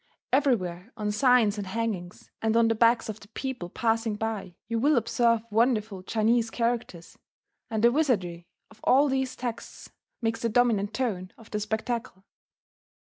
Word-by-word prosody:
Everywhere 220 -8 +1
on 210 -1 -1
signs 220 -2 +3
and 200 - -5
hangings, 195 -4 -4
and 225 0 +2
on 230 -1 +4
the - - +3
backs 230 +1 +3
of 220 -1 -6 0.2
people 260 -10 -4
passing 225 +1 0
by, 215 -4 -4
you 230 0 -1
will 290 +3 +3
observe 230 -1 +2
wonderful 220 -3 +1
Chinese 225 +4 +1
characters; 230 -8 -3 0.5
and 220 -1 -2
the 235 - +7
wizardry 190 - 0 0.2
of 220 - -18
all 280 +3 +5
these 265 -1 -1
texts 240 -2 -6 0.3
makes 225 -1 -1
the 230 - 0
dominant 220 -3 +2
tone 190 -8 -2
of 225 - -16
the 210 - -1
spectacle. 220 -1 -3
225 Hz, 150 wpm, -27 LUFS, 205-240 Hz, 0.5 s, the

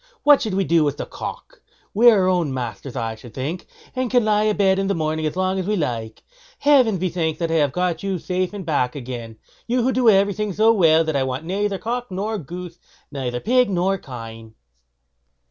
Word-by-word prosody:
What 290 -1 +6
should 215 -5 -2
we 195 - +2
do 170 -3 +3
with 145 -1 -1
the - - -4
cock? - - -8 0.3
We 235 +4 +7
are 205 -5 +4
our - - +2
own 175 -6 +1
masters, 120 -1 -5
I 115 -3 -2
should 110 +1 -13
think, 150 +7 -4 0.3
and 255 -1 -1
can 245 -2 +3
lie 210 0 +2
a 215 - +2
bed 190 -1 +2
in 195 - 0
the 200 - 0
morning 155 -1 -1
as 155 - -4
long 185 +1 0
as 185 - -3
we 210 - +1
like. 115 - -3 0.3
Heaven 260 -8 +4
be 185 +1 -1
thanked 160 -2 -2
that 165 -1 -1
I 165 - +2
have 145 -3 +2
got 180 +1 -1
you 195 -1 -2
safe 180 +2 -2 0.2
back 140 -5 0
again; 120 -4 -7 0.3
you 245 0 +1
who 260 - +2
do 250 -2 +3
everything 200 0 +2
so 220 +4 +4
well 165 -5 +4
that 155 -2 -2
I 140 - +2
want 130 +3 -3
neither 200 +2 -1
cock 240 +3 -4
nor 205 +3 -3
goose; 175 +2 -8 0.3
neither 125 -4 -3
pigs 250 - +2
nor 190 +1 0
kine." 115 -4 -10
180 Hz, 215 wpm, -21 LUFS, 140-210 Hz, 0.3 s, We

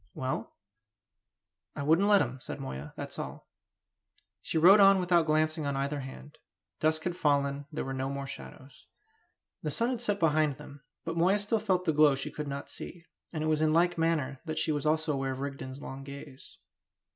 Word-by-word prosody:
"Well?" 130 -3 -3 1.2
"I - - -3
wouldn't 165 +7 +4
let 205 -4 +6
him," 130 0 -6
said - - -6
Moya. 65 +2 -6
"That's - - -6
all." - - -7 0.9
She 160 - -2
rode 185 +6 +8
on 195 -1 +7
without 175 -2 +3
glancing 155 0 +1
on 140 - -1
either 140 +2 -1
hand. 135 +2 -10 0.4
Dusk 155 0 +1
had 175 -1 -2
fallen; 140 -3 +1
there 155 - -3
were 135 - -4
no 135 0 -2
more 140 0 -4
shadows. 135 0 -10 0.7
The - - -2
sun 235 +2 0
had 245 -2 -3
set 205 -4 0
behind 155 -3 +2
them; 145 0 -12 0.2
but 165 0 -3
Moya 185 +4 +4
still 210 +2 0
felt 185 -4 0
the 160 - +2
glow 150 -2 +5
she 135 - -3
could 150 -1 -5
not 140 0 -5
see; 175 -1 -8 0.3
and 155 -2 -3
it - - 0
was 155 -1 +2
in 155 0 +3
like 175 +2 +3
manner 155 -5 0
that 155 -1 -4
she 160 - +2
was 145 -1 -2
aware 155 - +5
also 155 -4 -1
of 135 -1 -2
Rigden's 135 -1 -6
long 135 +1 -7
gaze. 140 -1 -11
155 Hz, 195 wpm, -30 LUFS, 140-170 Hz, 1.2 s, rode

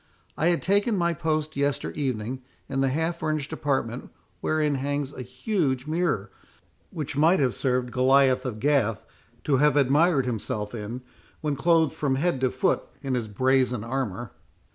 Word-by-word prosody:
I 160 - +1
had 175 -1 +1
taken 205 +3 +2
my 170 -1 +1
post 155 -1 -1
yester 140 0 -1
evening 130 -2 -3 0.3
in 135 -1 -1
the 135 - +2
half 160 +5 -1
furnished 155 -2 -2
apartment, 130 -4 -2 0.3
wherein 155 -2 +1
hangs 140 +1 -2
a - - -7
huge 130 - -1
mirror, 170 +3 -1 0.6
which 155 -8 -5
might 160 +6 +4
have 130 -4 +2
served 125 -2 -1
Goliath 130 0 +4
of 120 -5 -4
Gath 120 -5 +1 0.4
to 140 -3 +2
have 145 +1 +4
admired 145 +1 +3
himself 105 -3 -3
in, 115 +2 -5 0.4
when 150 -2 -1
clothed 160 +1 +3
from 140 -3 0
head 140 -1 0
to 130 - +3
foot 185 +7 +1 0.2
in 135 -2 -1
his 120 -3 -1
brazen 125 +1 +1
armour. 120 -3 -3
135 Hz, 160 wpm, -26 LUFS, 125-155 Hz, 0.6 s, might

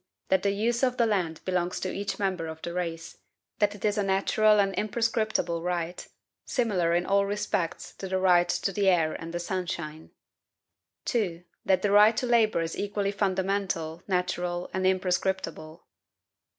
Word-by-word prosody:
That 190 -1 +3
the 200 - +1
use 225 +4 0
of 250 -1 +1
the 235 - +4
land 180 -7 -1
belongs 180 -1 -1
to 185 - -2
each 195 -1 -3
member 190 -4 -1
of 160 0 -7
the 170 - -4
race; 165 -2 -4 0.4
that 205 0 +2
it 205 - -6
is 210 0 +1
a - - +2
natural 205 +2 +3
and 195 -1 +2
imprescriptible 215 -5 0
right, 175 0 -3 0.4
similar 185 -9 +1
in 175 +1 +1
all 200 0 +2
respects 205 -4 -2
to 195 - -5
the 190 0 0
right 175 -2 +4
to 195 - 0
the 195 0 +2
air 165 -4 +2
and 165 0 -7
the 175 - -3
sunshine. 170 -3 -4 1.0
2. 180 -8 -1 0.2
That 190 -1 +2
the 205 - +2
right 210 +2 +6
to - - 0
labor 225 -6 +3
is 165 0 -3
equally 205 0 -1
fundamental, 190 -4 -1
natural, 180 -1 -1
and 185 0 +1
imprescriptible." 185 -3 -1
190 Hz, 165 wpm, -27 LUFS, 175-205 Hz, 1.0 s, right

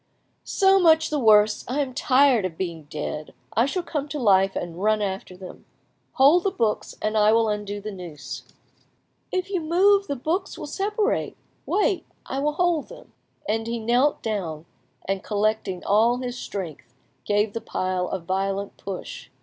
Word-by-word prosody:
"So 390 0 +4
much 320 -3 +4
the 300 - 0
worse. 215 -3 +5
I 260 +4 -2
am 270 -3 -1
tired 265 -3 +4
of 175 -3 -4
being 170 -4 -4
dead; 150 +1 -6 0.2
I 230 +5 +4
shall 360 +5 -2
come 295 -4 -3
to 300 - -4
life 195 -6 +3
and 175 +1 -5
run 215 +1 +3
after 190 -2 -4
them. 185 -1 -11 0.5
Hold 290 +5 +6
the 390 - +2
books, 230 - -1
and 215 +1 0
I 210 0 +5
will 225 0 +3
undo 205 -1 -3
the 215 +1 -6
noose." 165 -8 -8 0.9
"If 370 +1 -2
you 370 -3 0
move, 390 +5 +3
the 280 - -2
books 320 +9 -2
will - - -6
separate; 420 +3 -1 0.3
wait, 405 -2 +1 0.2
I 270 - -3
will 295 +2 0
hold 345 -2 +1
them." - - -13 0.3
And 225 +1 -1
he 235 0 -2
knelt 245 +6 +1
down, 175 -8 -3 0.4
and 195 0 -2
collecting 210 -3 -1
all 225 +4 +3
his 250 -1 -4
strength, 155 - -7 0.3
gave 205 0 +1
the 230 - -4
pile 185 -1 -2
a 190 - -2
violent 195 +3 -2
push. 195 -2 -7
220 Hz, 170 wpm, -24 LUFS, 195-295 Hz, 0.9 s, Hold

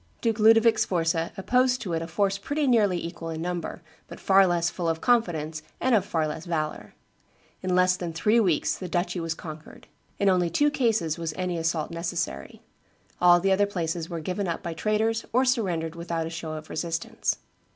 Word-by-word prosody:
Duke 225 -2 0
Ludovic 225 +1 +6
Sforza 165 -5 0
opposed 250 +5 +2
to 180 -5 -3
it 165 - -1
a 165 - -5
force 195 +3 0
pretty 290 +8 -1
nearly 215 -8 +3
equal 170 -1 -6
in 160 -1 -4
number, 175 +1 -4 0.2
but - - -10
far 195 0 +5
less 175 -1 +1
full 170 -2 -2
of 165 0 -1
confidence 165 -11 +1 0.2
and 255 - +1
of 210 -5 +4
far 160 -5 -1
less 155 +2 -6
valor. 155 -3 -3 0.7
In 185 -1 0
less 180 0 +4
than 175 -2 -4
three 210 +8 +2
weeks 180 -9 +1
the 185 - -7
duchy 175 +1 -1
was 165 -1 -2
conquered; 155 -2 -10 0.3
in 200 - +1
only 180 -2 +3
two 290 - +2
cases 220 - 0
was 165 -2 -3
any 180 -1 -2
assault 165 -1 -1
necessary; 170 - -4 0.6
all 175 0 +7
the 195 +2 +1
other 200 +2 +3
places 170 -3 -3
were 170 - -4
given 185 +4 -2
up 170 - -3
by 170 - -3
traitors 215 +6 0
or 255 +2 +4
surrendered 180 -11 0
without 170 -1 -3
a 165 - -5
show 165 -1 -5
of 155 0 -8
resistance. 165 +1 -2
175 Hz, 195 wpm, -26 LUFS, 165-205 Hz, 0.7 s, all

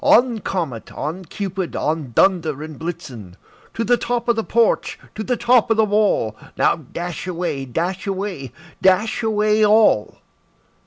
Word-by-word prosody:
On! 240 -1 +4
Comet, 165 - -4
on! 170 +5 -5
Cupid, 190 -1 -4
on! 155 -4 -2
Dunder 160 -6 +2
and 155 -2 -9
Blitzen 130 - -7 0.4
To 230 - -1
the 240 +2 +3
top 240 0 -2
of 235 - +3
the 225 - -1
porch, 230 0 +1 0.2
to 215 - -5
the 245 +2 -1
top 240 -1 +3
of 225 - +2
the 220 - +5
wall! 205 - +1 0.2
Now, - - +3
dash 170 +4 -6
away, 170 -6 -3
dash 175 +9 -3
away, 190 - -4 0.3
dash 200 +5 +3
away 215 -1 +2
all!" 210 - +4
190 Hz, 155 wpm, -20 LUFS, 160-220 Hz, 0.4 s, the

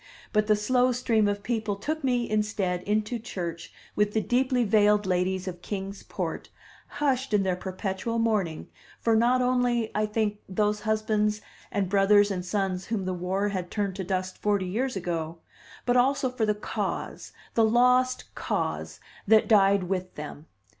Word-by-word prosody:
But 210 -1 +2
the 215 - +5
slow 250 +4 +2
stream 230 -4 +2
of 205 0 -2
people 220 -2 -1
took 305 +9 -4
me, 245 -2 +1
instead, 210 -4 -1
into 215 +3 0
church 175 -7 -6 0.2
with 210 0 +1
the 220 - +2
deeply 250 +2 +1
veiled 210 -1 +3
ladies 185 +1 0
of 175 -1 -6
Kings 195 0 -5
Port, - - -5 0.4
hushed 270 -5 0
in 200 - +3
their 185 -1 +1
perpetual 190 +4 -3
mourning 210 -8 0 0.3
for 230 -1 +2
not 245 +3 +3
only, 245 -2 +1
I 215 0 +1
think, 210 -1 -1
those 210 +2 +1
husbands 215 -1 +1 0.3
and 200 -2 0
brothers 205 +1 +4
and 180 -2 -2
sons 190 -1 -2
whom 210 -4 -2
the 185 - -1
war 185 +3 -1
had 185 -3 -4
turned 200 -3 -2
to 190 - -3
dust 185 0 -3
forty 205 -2 +1
years 245 +8 -2
ago, 170 -3 -3 0.5
but 245 - +2
also 260 +1 +2
for 230 -4 -1
the 210 - +2
Cause, 210 - -4 0.2
the 230 - +3
lost 250 +3 +3
Cause, - - -3 0.3
that 220 +1 +5
died 200 -2 +5
with 185 0 -3
them. 150 +1 -8
210 Hz, 165 wpm, -27 LUFS, 190-230 Hz, 0.5 s, the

